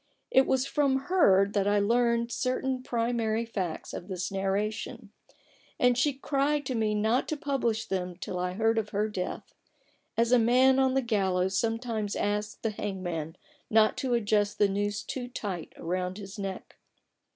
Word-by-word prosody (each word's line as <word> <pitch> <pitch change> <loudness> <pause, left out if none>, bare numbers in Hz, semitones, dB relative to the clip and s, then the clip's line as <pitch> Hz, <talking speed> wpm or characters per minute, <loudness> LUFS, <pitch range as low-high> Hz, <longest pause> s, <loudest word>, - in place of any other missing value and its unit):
It 265 0 +5
was 260 0 +2
from 280 -1 +1
her 200 - +5
that 200 -1 +1
I 205 0 +3
learned 235 +2 +2
certain 255 +1 -1
primary 230 -2 -1
facts 190 -8 -4
of 175 - -6
this 185 -2 -3
narration; 205 +3 -2 0.7
and 250 0 +4
she 270 +5 +2
cried 280 +2 0
to 260 - -2
me 220 -2 0
not 220 +4 +1
to 310 - -2
publish 235 -6 -1
them 180 -2 -3
till 180 0 -5
I 180 0 -1
heard 225 +3 +2
of 210 -1 -4
her 210 +1 0
death 185 -4 -5 0.3
— - - -40
as 230 +1 +2
a 250 - +6
man 255 +3 +5
on 265 -1 +3
the 270 - +2
gallows 190 -4 +1
sometimes 225 -1 -1
asks 210 +1 -1
the 225 - -3
hangman 175 -6 -4 0.3
not 220 0 +4
to 255 -2 0
adjust 210 -2 +1
the 205 - +4
noose 205 +1 -2
too 250 -2 -5
tight 200 -9 -5
round 180 +2 -3
his 200 0 -9
neck. 195 -1 -6
220 Hz, 170 wpm, -28 LUFS, 195-245 Hz, 0.7 s, a